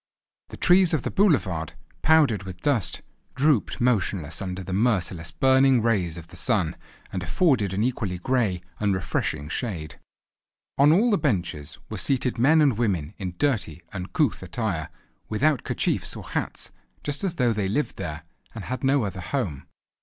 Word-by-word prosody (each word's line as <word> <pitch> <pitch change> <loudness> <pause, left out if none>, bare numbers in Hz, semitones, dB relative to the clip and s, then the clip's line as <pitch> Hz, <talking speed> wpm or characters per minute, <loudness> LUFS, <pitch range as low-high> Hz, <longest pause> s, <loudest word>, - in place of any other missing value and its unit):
The - - -9
trees 180 -2 +5
of 145 - -2
the - - -2
boulevard, 95 - +1 0.3
powdered 145 - +4
with 95 -2 -9
dust, 120 - +1 0.3
drooped 135 -3 +2
motionless 95 -9 0
under 95 0 -4
the 95 - -5
merciless 95 -6 0
burning 130 +1 +4
rays 95 -8 +1
of 85 -1 -10
the 90 - -13
sun, 95 -5 +1 0.4
and 95 - -2
afforded 105 - +2
an 100 +3 0
equally 115 -7 -1
grey, 100 -3 0 0.2
unrefreshing 95 -7 -1
shade. 80 -5 -4 0.8
On 145 +2 +7
all 215 +9 +4
the 205 - +3
benches 85 - -1
were - - -5
seated 125 -3 0
men 155 +6 +5
and 130 -7 +2
women 95 -8 0
in 90 -3 -4
dirty, 100 - -1
uncouth 95 - -1
attire, 100 - -3 0.4
without 140 +5 +2
kerchiefs - - -1
or - - -9
hats, - - -4 0.3
just 145 +3 -3
as 185 -3 -1
though 125 -6 +2
they 100 -3 -1
lived 145 +9 -1
there 80 -5 -5 0.3
and - - -6
had 130 +1 -5
no 135 -1 +3
other 95 -2 -4
home. 90 - -3
105 Hz, 160 wpm, -25 LUFS, 90-135 Hz, 0.8 s, On